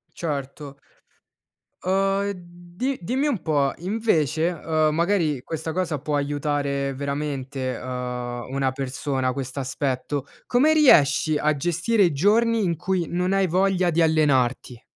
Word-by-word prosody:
Certo. 140 -2 -5 1.1
Uhm, 195 +1 +1
e - - -2 0.4
di 260 +6 -1
dimmi 260 - 0
un 240 - -1
po' 145 -4 +1
invece, 170 - +1
uhm, 155 -2 0
magari 165 -5 +1
questa 160 0 -4
cosa 165 -4 -1
può 150 +2 -2
aiutare 140 -1 -1
veramente, 140 -2 -3
uhm, 125 0 -5
una 135 -1 0
persona 130 0 -2
quest'aspetto, 135 +1 -3 0.2
come 265 +6 +4
riesci 155 - +5
a 150 +1 +1
gestire 175 +8 +1
i 170 -4 +2
giorni 220 +8 +3
in 170 -3 0
cui 175 +1 -1
non 180 +2 0
hai 195 -1 +2
voglia 185 +1 +2
di 170 0 +1
allenarti? 135 -6 +1
155 Hz, 130 wpm, -24 LUFS, 135-180 Hz, 1.1 s, riesci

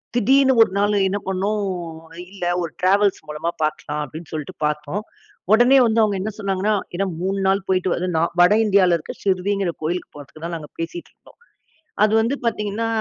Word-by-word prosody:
திடீர்னு 265 +3 +4
ஒரு 220 - +5
நாள் 205 +1 +2
என்ன 195 - -1
பண்ணோம்? 195 +3 -1 0.7
இல்ல, 195 -3 -5 0.2
ஒரு 170 -2 -4
டிராவல்ஸ் 200 +2 +3
மூலமா 150 +3 -3
பார்க்கலாம் 150 -1 -2
அப்படின்னு 160 +3 -10
சொல்ட்டு 155 -2 -5
பார்த்தோம். 150 +7 -2 0.5
உடனே 245 +4 +6
வந்து 225 0 +2
அவங்க 205 -2 +1
என்ன 215 - -3
சொன்னாங்கன்னா, 200 +1 0 0.2
ஏனா 195 +3 0 0.2
3 195 +1 -1
நாள் 195 0 +1
போயிட்டு 185 -1 +1
வந்து 180 +1 -2
நான் 165 +2 +1
வட 180 +4 +6
இந்தியாவில 190 -4 +4
இருக்கிற 155 - -9
சிர்டிங்கிற 195 -1 0
கோயிலுக்கு 175 +3 -3
போறதுக்கு 145 +2 -12
தான் 170 0 -4
நாங்க 150 -2 -10
பேசிட்டு 165 +1 -6
இருந்தோம். - - -22 0.7
அது 215 - 0
வந்து 235 +5 0
பார்த்தீங்கன்னா, 210 0 -1
190 Hz, 170 wpm, -21 LUFS, 170-210 Hz, 0.7 s, உடனே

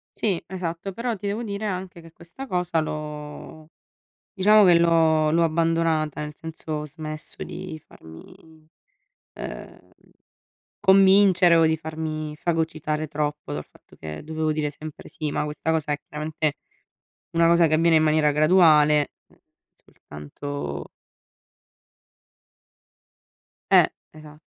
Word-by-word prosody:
Sì, 195 -6 0
esatto, 180 0 -5
però 235 +4 -3
ti 200 0 -6
devo 210 +4 -2
dire 205 -1 -4
anche 185 -3 -5
che 165 0 -15
questa 170 +12 -11
cosa 180 -5 0
l'ho 150 0 -7 0.6
diciamo 210 +2 +5
che 175 -2 +6
l'ho 160 -2 +3
l'ho 170 +2 +2
abbandonata, 165 -2 0
nel 150 0 -6
senso 160 -1 -8
ho 150 0 -3
smesso 155 +1 -8
di 180 -4 -7
farmi, 155 - -16 0.7
ehm, - - -9 0.9
convincere 190 -2 +5
o 165 -1 +5
di 160 0 +1
farmi 155 -1 -5
fagocitare 155 -2 -2
troppo 150 - -3
dal 75 +1 -4
fatto - - -22
che 75 -1 -8
dovevo 155 0 -2
dire 150 -1 -1
sempre 155 +1 -10
sì, 155 -2 -4
ma - - -1
questa 150 +2 -3
cosa 155 -2 0
è - - -2
chiaramente 155 0 -3 0.8
una 165 0 +3
cosa 170 0 +5
che 155 - -1
avviene 165 +1 +4
in 155 - +3
maniera 155 -1 +3
graduale, 150 -2 +4 0.2
ehm, - - -26 0.3
soltanto 75 - -8 2.8
Eh, - - +7 0.3
esat 155 0 -14
160 Hz, 125 wpm, -24 LUFS, 150-170 Hz, 2.8 s, Eh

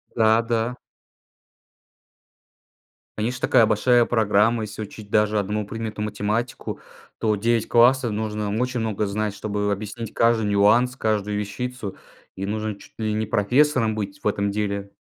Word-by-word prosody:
Да, 110 0 +4
да. 115 +1 -1 2.4
Конечно, 120 +4 -2
такая 120 -3 +5
большая 120 +3 +3
программа. 110 0 +2
Если 105 0 -7
учить 105 0 -11
даже 105 0 +2
одному 105 +1 -2
предмету 110 0 -5
математику, 105 +3 -3 0.4
то 110 -1 +1
9 115 +2 +1
классов 120 0 +4
нужно 105 -1 -2
очень 125 -1 -1
много 110 -2 -1
знать, 105 0 -2
чтобы 105 0 -2
объяснить 110 +2 -5
каждый 115 -2 +3
нюанс, 105 +5 +3
каждую 105 -3 -1
вещицу. 110 0 -5 0.4
И 95 +1 -4
нужно 110 +1 -3
чуть 100 - -17
ли 110 -1 -1
не 110 +1 -1
профессором 120 +1 +2
быть 100 -2 -5
в - - 0
этом 100 -1 0
деле. 100 -1 -3
110 Hz, 140 wpm, -23 LUFS, 105-115 Hz, 2.4 s, такая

